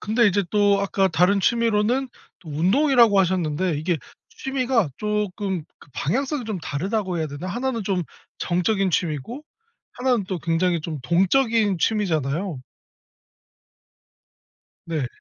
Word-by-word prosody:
근데 220 +2 +2
이제 200 0 +2
또 205 -1 +3
아까 195 -1 +1
다른 185 +4 +3
취미로는 235 +4 +1 0.3
또 165 - -13
운동이라고 225 - +4
하셨는데 175 -3 +1
이게 170 +2 0 0.3
취미가 255 - 0
쪼끔 205 -4 -2
그 - - -18
방향성이 265 - -1
좀 215 -4 -3
다르다고 185 +4 -2
해야 160 - -1
되나? 145 +5 -7
1 245 +8 -2
는 230 -3 -3
좀 190 -2 -1 0.4
정적인 190 +2 +1
취미고 170 - -2 0.5
1 255 +1 -1
는 205 - -2
또 185 - -2
굉장히 170 +1 0
좀 155 -1 -5
동적인 205 - +2
취미잖아요. 165 - 0 2.3
네. 155 -6 -2
195 Hz, 265 characters per minute, -23 LUFS, 170-225 Hz, 2.3 s, 운동이라고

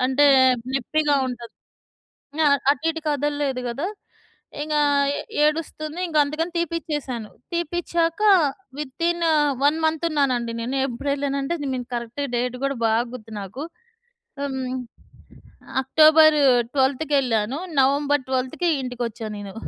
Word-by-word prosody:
అంటే 270 +2 +4 0.5
నొప్పిగా 295 +3 +1
ఉంటది. 240 -2 -7 0.9
ఆహ్, 280 -1 +5
అటుఇటు 325 +3 -2
కదల్లేదు 290 -2 -1
గదా! 275 +9 -3 0.8
ఇంకా 300 -1 0 0.4
ఏ - - -3 0.2
ఏడుస్తుంది. 310 +1 -2
ఇంక 310 -2 -1
అందుకని 310 +4 -3
తీపిచ్చేశాను. 300 -9 -3 0.2
తీపిచ్చాక 340 +1 -1 0.6
వితిన్ 335 +5 -2
ఆ! - - +4 0.3
1 295 +2 +4
మంత్ 315 +1 0
ఉన్నానండి 255 -6 0
నేను, 250 +4 -3
ఎప్పుడెళ్ళానంటే 280 +3 -2
నేను 255 -3 -3
కరెక్ట్‌గ 240 +4 -3
డేట్ 250 +1 -1
కూడా 275 0 0
బాగ 225 +1 +3
గుర్తు 225 -3 -10
నాకు. 200 +9 -7 0.8
హ్మ్. 265 -2 -3 1.1
అక్టోబర్ 310 +2 +6 0.4
12థ్ 270 +2 +1
కెళ్ళాను. 250 0 +1 0.2
నవంబర్ 285 +1 +2
12థ్‌కి 260 +7 -1
ఇంటికొచ్చా 240 -3 -5
నేను. 200 -1 -8
280 Hz, 110 wpm, -23 LUFS, 250-310 Hz, 1.1 s, అక్టోబర్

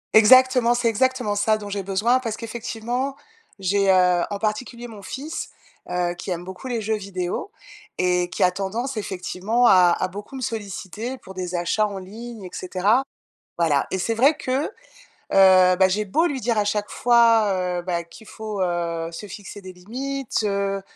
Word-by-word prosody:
Exactement, 250 +2 +6
c'est 240 -1 +2
exactement 225 -2 +1
ça 215 +1 +2
dont 205 -1 -8
j'ai 200 0 -3
besoin 205 +7 +1
parce 225 -3 -4
qu'effectivement, 240 +3 -4 0.4
j'ai 195 +1 +1
heu, 180 -2 +4
en 205 - -3
particulier 230 +3 -3
mon 215 -3 -11
fils, 280 +10 -6 0.4
heu, 180 -1 0
qui 175 +2 -8
aime 175 -1 -3
beaucoup 190 +7 -8
les 235 -3 -2
jeux 220 +1 0
vidéo 195 - -4 0.5
et 180 -1 +1
qui - - -1
a 180 - +5
tendance 215 +8 -3
effectivement 205 +3 -1
à 180 -2 +6
à 185 - 0
beaucoup 205 +7 -9
me 265 - -6
solliciter 220 +2 -5
pour 190 -6 -12
des 180 -1 -4
achats 195 +5 +1
en 200 - -6
ligne, 220 +3 -9
et 180 - -7
cetera 195 +7 +1 0.5
voilà. 155 -5 +2
Et 190 - 0
c'est 225 +5 -1
vrai 275 +7 +4
que, 260 +3 -1
heu, - - -11 0.6
bah, 185 -1 +6
j'ai 210 +3 0
beau 315 - +1
lui 280 -6 -2
dire 235 -1 0
à 210 - +3
chaque 205 0 -1
fois, 220 -7 +3
heu, - - -4
bah, 175 -1 -2
qu'il 170 +6 -15
faut, 215 -2 -6
heu, 170 -2 -2
se 210 - -7
fixer 205 +1 -9
des 185 -1 -10
limites, 250 +7 -4
heu, 200 -1 -1
205 Hz, 180 wpm, -23 LUFS, 185-235 Hz, 0.6 s, Exactement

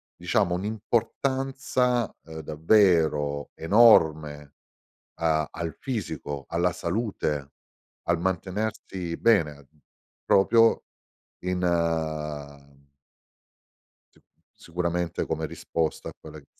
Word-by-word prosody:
diciamo 90 0 +1
un'importanza, 125 +4 -1
uhm, 80 -1 -9
davvero 80 -4 +2
enorme 80 -7 +4 0.6
a 80 -2 +1
al 85 -1 -5
fisico, 80 - -4
alla 85 +1 +1
salute, 85 -8 -2 0.5
al 85 0 +1
mantenersi 95 -1 -3
bene 75 -11 +2 0.6
proprio 115 +4 +4 0.6
in 90 0 -1 2.5
s - - -24 0.5
sicuramente 85 0 -2
come - - -2
risposta 80 -2 -3
a - - -11
quella - - -11
che - - -21
90 Hz, 80 wpm, -26 LUFS, 80-110 Hz, 2.5 s, enorme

